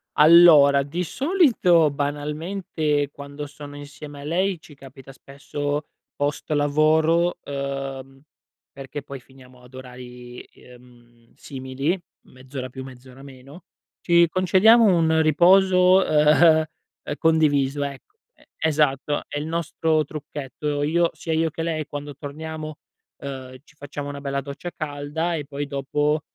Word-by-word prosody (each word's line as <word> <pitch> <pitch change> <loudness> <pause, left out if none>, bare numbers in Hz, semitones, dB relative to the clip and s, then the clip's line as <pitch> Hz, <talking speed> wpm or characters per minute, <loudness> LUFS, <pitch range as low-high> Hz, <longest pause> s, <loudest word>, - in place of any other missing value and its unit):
Allora, 150 -3 +7
di 165 +6 -4
solito, 235 - +3
banalmente, 150 +1 -2
quando 140 +1 -8
sono 145 0 -11
insieme 145 0 -10
a - - -9
lei 180 +3 0
ci 155 -1 -16
capita 135 0 -14
spesso 145 +2 -5 0.3
post 145 +1 -3
lavoro, 155 +4 +2
ehm, 135 -1 -6 0.5
perché 140 +1 -8
poi 140 -1 -9
finiamo 130 -1 -19
ad 125 +1 -18
orari, 125 -1 -11
ehm, 120 -1 -20
simili, 135 +5 -4 0.3
mezz'ora 130 0 -8
più 130 +1 -9
mezz'ora 130 0 -13
meno, 140 +4 -14 0.4
ci 170 -1 +4
concediamo 190 +7 +4
un 165 -5 +3
riposo, 180 +3 +5
ehm, 155 +1 +4 0.4
ehm, 145 - -4
condiviso, 145 -3 +2
ecco 140 - -10 0.2
e - - -26
esatto, 150 -2 0
è 145 - -4
il 150 - -5
nostro 160 -1 0
trucchetto. 145 0 -5
Io 170 +3 +2
sia 165 - -6
io 160 +1 +1
che 165 +1 -5
lei, 160 -2 -2
quando 145 0 -7
torniamo, 155 +2 -7 0.4
ehm, 130 -2 -8
ci 150 - -24
facciamo 145 0 -7
una 140 0 -7
bella 140 0 -3
doccia 140 +5 -7
calda 155 +3 -3
e 150 -3 -5
poi 145 0 -5
dopo, 145 +2 -1
145 Hz, 130 wpm, -23 LUFS, 140-160 Hz, 0.5 s, Allora